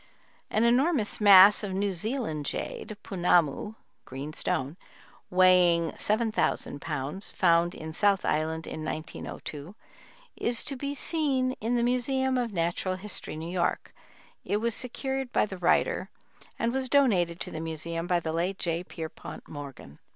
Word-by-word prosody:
An 215 - +1
enormous 245 -1 +2
mass 200 0 +8
of 195 -2 -3
New 195 +1 0
Zealand 180 - -3
jade 215 - -5
(punamu, 175 +1 +1 0.3
"green 140 +4 -7
stone") 140 -1 0 0.5
weighing 180 -2 +4
7000 215 -9 0
pounds, 150 +6 -4
found 170 -1 +2
in 160 0 -7
South 200 +2 +2
Island 160 +1 -1
in 155 - -6
1902, 155 +1 -6 0.6
is 235 0 +1
to 275 - -3
be 280 +2 -4
seen 275 -4 +1
in 230 +3 0
the 235 - +1
Museum 260 +2 +1
of 240 -2 -2
Natural 175 +1 -1
History, 190 -3 -2
New 160 +2 -6
York; 180 -1 -1 0.5
it 205 - 0
was 230 +1 -1
secured 265 +2 -3
by - - +2
the 190 -3 -8
writer 175 - +1 0.5
and 230 +1 0
was 260 -1 -1
donated 190 -12 +3
to - - -4
the 160 - -5
Museum 165 +1 -4
by 175 -1 +2
the 160 -1 -4
late 180 +4 -1
J. 170 -1 -2
Pierpont 160 -3 -8
Morgan. 135 - -10
185 Hz, 145 wpm, -28 LUFS, 165-235 Hz, 0.6 s, mass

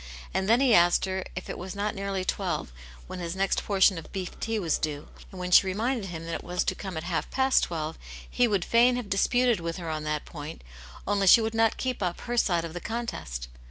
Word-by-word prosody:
And 190 +2 0
then 235 +3 +5
he 260 -4 +4
asked 175 -1 +5
her 190 0 -2
if 185 - -6
it - - -6
was 185 +1 -6
not 205 +1 -1
nearly 195 -1 -3
twelve, - - -2 0.3
when - - -7
his 170 0 -4
next 195 +1 0
portion 195 -3 +3
of 165 - -13
beef 190 -2 -5
tea 225 0 -1
was 170 -7 0
due; 150 -1 -4 0.2
and 190 - -10
when 180 0 -4
she 190 - +7
reminded 220 +3 -1
him 165 -1 -6
that 165 - -4
it - - -4
was 180 0 -1
to - - 0
come 190 -4 -6
at 160 - -4
half 170 -2 -2
past 265 0 +3
twelve, 160 -1 -4 0.3
he 245 -1 +2
would 200 -5 0
fain 240 +2 +4
have 245 -5 -5
disputed 245 +3 +3
with 165 0 -4
her 170 -3 -4
on 155 -1 -3
that 150 -1 -2
point, 150 - -8 0.4
only 200 -1 +1
she 210 - +9
would 220 0 -1
not 225 -1 +2
keep 255 -3 -2
up 180 -2 -2
her 240 - -3
side 175 -7 +2
of 165 - -7
the 175 - -6
contest. 215 - -4
190 Hz, 240 wpm, -27 LUFS, 170-225 Hz, 0.4 s, she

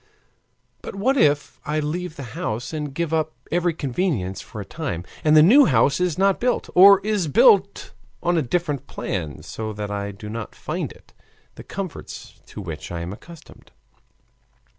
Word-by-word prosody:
"But - - -8
what 250 +8 +1
if 145 - +2
I 150 +1 -1
leave 160 +3 -3
the 140 - -7
house 120 +7 -4
and 150 -2 -3
give 165 +3 -3
up 155 -1 0 0.2
every 175 0 +1
convenience 130 - -2
for 110 - -10
a 100 - -6
time, 115 - -4 0.2
and 155 0 +5
the 155 - +8
new 265 - +7
house 135 +4 +3
is 180 -4 0
not 195 0 +3
built, 245 0 -1
or 195 +2 +8
is 210 -5 0
built 195 +7 +4 0.3
on 175 0 +2
a 165 - +3
different 145 -1 -2
plan 80 -6 -4
so 110 -1 -5
that 105 0 -5
I 100 0 -3
do 100 +1 -9
not 110 +1 -6
find - - -4
in - - -14
it - - -26 0.4
the - - -11
comforts 195 -4 -8
to 105 - -8
which 80 -4 -7
I 85 -1 -4
am 85 +3 -5
accustomed?" 165 +9 -14
150 Hz, 180 wpm, -23 LUFS, 110-180 Hz, 0.4 s, the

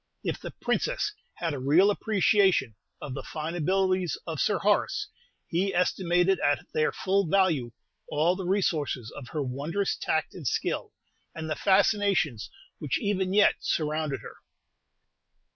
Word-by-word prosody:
If - - -2
the - - -7
Princess 420 - -1 0.2
had 165 -3 -2
a 140 - -4
real 160 +10 +4
appreciation 200 - +2 0.3
of 140 - -6
the 135 - -5
fine 155 +1 -5
abilities 185 +1 +1
of - - -4
Sir - - +2
Horace, - - +1 0.4
he 190 +3 0
estimated 180 +1 +2
at 145 0 +1
their 155 - +2
full 195 -1 0
value 160 -10 +2 0.4
all 160 +4 +2
the 185 -2 -5
resources 155 - 0
of 130 - -8
her 150 +3 -3
wondrous 150 +10 -2
tact 160 0 -1
and 160 -8 -6
skill, - - -1 0.4
and 160 0 -5
the 155 - -1
fascinations 195 - +2 0.3
which 150 -4 -1
even 190 -2 0
yet 205 +1 +4
surrounded 155 -2 -1
her. - - -11
175 Hz, 145 wpm, -27 LUFS, 150-195 Hz, 0.4 s, real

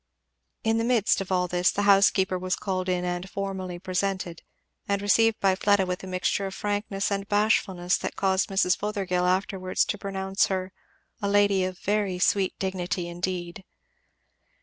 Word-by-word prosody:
In 225 0 +2
the - - 0
midst 230 -4 +2
of 195 - -6
all 180 -1 +2
this 180 0 +2
the 205 - -1
housekeeper 195 -2 +4
was 185 0 -1
called 185 -2 -3
in 180 -1 0
and 175 +1 -3
formally 190 -3 -4
presented, 185 -1 -3 0.5
and 200 0 +1
received 225 +2 +3
by 195 -1 +3
Fleda 200 0 +2
with 180 +1 -4
a - - -7
mixture 185 +2 -1
of 190 - -7
frankness 205 -1 -2
and 200 0 -2
bashfulness 200 -4 +1
that - - -4
caused 190 -1 +1
Mrs. 190 -1 +2
Fothergill 190 -4 -1
afterwards 185 0 0
to 205 - -3
pronounce 195 0 0
her 190 -1 -3 0.5
"a 200 - 0
lady 200 -1 +3
of 185 0 -3
a - - -23
very 205 -2 0
sweet 190 +1 +1
dignity 180 -2 -2
indeed." 175 +1 -4
190 Hz, 170 wpm, -26 LUFS, 185-200 Hz, 0.5 s, housekeeper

